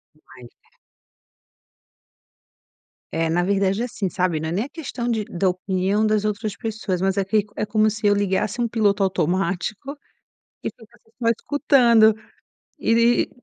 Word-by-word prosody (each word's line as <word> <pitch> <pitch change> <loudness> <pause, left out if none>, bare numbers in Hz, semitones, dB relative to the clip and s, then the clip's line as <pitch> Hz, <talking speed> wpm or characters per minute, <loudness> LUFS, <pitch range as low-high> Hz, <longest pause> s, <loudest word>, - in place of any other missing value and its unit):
Mas 130 -5 -15
é. - - -36 2.3
É, 165 0 0
na 175 +2 +1
verdade, 195 +2 +1
é 245 - 0
assim, 210 -5 -3
sabe, 180 -3 0
não 160 +1 -3
é - - -4
nem 200 +7 -1
a 285 - -11
questão 265 -7 -5
de 220 -2 0
da 195 -3 -1
opinião 190 +3 0
das 215 -1 +1
outras 210 -1 -3
pessoas, 215 -5 -3
mas 190 0 +1
é 200 - +2
que 205 +2 +1
é - - -2
como 215 0 +2
se 215 0 -5
eu 205 - +5
ligasse 205 +3 -1
um 240 - +1
piloto 210 -3 +1
automático 190 - -1 0.7
que - - -2
ficasse 225 0 -20
só 230 - +3
escutando 235 -3 +4 0.7
e 230 +1 +3
e - - -7
205 Hz, 160 wpm, -22 LUFS, 190-225 Hz, 2.3 s, eu